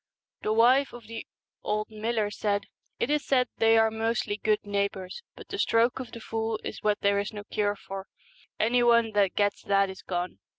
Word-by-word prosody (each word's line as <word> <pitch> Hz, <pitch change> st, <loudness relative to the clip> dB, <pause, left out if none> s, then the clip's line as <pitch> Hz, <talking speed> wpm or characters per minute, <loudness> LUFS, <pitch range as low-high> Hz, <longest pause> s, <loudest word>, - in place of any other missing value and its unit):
The 215 Hz, -, -1 dB
wife 250 Hz, +5 st, +4 dB
of 240 Hz, -2 st, -10 dB
the 225 Hz, +1 st, -7 dB, 0.3 s
old 215 Hz, +1 st, -2 dB
miller 215 Hz, -1 st, -1 dB
said, 205 Hz, -1 st, -1 dB, 0.3 s
'It 270 Hz, -, 0 dB
is 300 Hz, -1 st, +1 dB
said 250 Hz, -2 st, +2 dB
they 225 Hz, 0 st, +5 dB
are 225 Hz, 0 st, +4 dB
mostly 220 Hz, -1 st, -1 dB
good 215 Hz, 0 st, +1 dB
neighbours, 200 Hz, -, -2 dB
but -, -, -12 dB
the 395 Hz, -, -5 dB
stroke 230 Hz, -3 st, +3 dB
of 255 Hz, -, -7 dB
the 230 Hz, -, -8 dB
fool 225 Hz, -1 st, -2 dB
is -, -, -6 dB
what 210 Hz, 0 st, +1 dB
there 200 Hz, 0 st, +3 dB
is 205 Hz, -, -3 dB
no 205 Hz, -2 st, -7 dB
cure 205 Hz, 0 st, -1 dB
for; 195 Hz, -1 st, -8 dB, 0.5 s
any 245 Hz, +3 st, +3 dB
one 235 Hz, -2 st, +4 dB
that 200 Hz, -3 st, +2 dB
gets 205 Hz, -1 st, +1 dB
that 195 Hz, -1 st, +2 dB
is 190 Hz, -, -11 dB
gone. 180 Hz, -1 st, -4 dB
215 Hz, 200 wpm, -28 LUFS, 205-230 Hz, 0.5 s, they